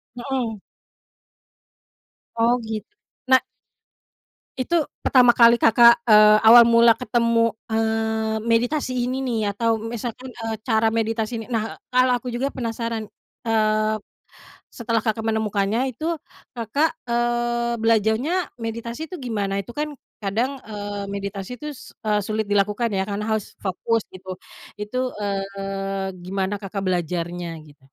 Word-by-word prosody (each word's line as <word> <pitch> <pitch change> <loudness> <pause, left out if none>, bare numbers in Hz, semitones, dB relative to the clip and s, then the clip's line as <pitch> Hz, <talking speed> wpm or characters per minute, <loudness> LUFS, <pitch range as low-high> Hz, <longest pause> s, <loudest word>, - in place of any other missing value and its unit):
Mhm. 240 -5 -3 1.7
Oh 235 +2 +3
git 220 -2 -5 0.4
na 260 0 +6 1.2
Itu, 325 +5 +1 0.2
pertama 250 -2 +5
kali 235 0 +6
Kakak, 235 +1 +6
eee, 215 -1 +7
awal 235 +1 +9
mula 235 0 +6
ketemu, 230 -2 +1 0.2
eee, 220 0 0
meditasi 245 +5 +1 0.2
ini 260 +1 -2
nih 240 -4 -1 0.2
atau 230 0 +1
misalkan, 235 +3 -5
eee, 225 -3 -5
cara 220 -1 +3
meditasi 225 0 -1
ini. 225 - -7
Nah, 225 -2 -3
kalau 255 0 +3
aku 250 - -10
juga 250 +3 -2
penasaran, 230 -2 -4 0.4
eee, 215 -1 +2 0.8
setelah 230 -2 -1
Kakak 220 0 0
menemukannya 220 +1 0
itu 320 +7 -2 0.4
Kakak, 285 +8 0
eee, 240 0 0
belajarnya 225 - +2 0.2
meditasi 230 +4 -5
itu 335 +1 -8
gimana? 205 -6 -2
Itu 215 +5 -10
kan 300 0 -2 0.2
kadang, 230 +7 -1
eee, 205 -1 -5
meditasi 200 +3 -5
tuh 300 -3 -8
eee, 210 -1 +1
sulit 215 0 -2
dilakukan 205 +3 +1
ya 190 - +1
karena 205 +1 -4
harus 210 - -7
fokus 220 +4 0
gitu. 185 0 -9 0.4
Itu, 255 +5 -2
eee, 195 -1 -3
gimana 195 +2 -2
Kakak 195 0 -5
belajarnya 175 -1 -2 0.2
gitu? 145 -2 -20
225 Hz, 125 wpm, -23 LUFS, 210-240 Hz, 1.7 s, awal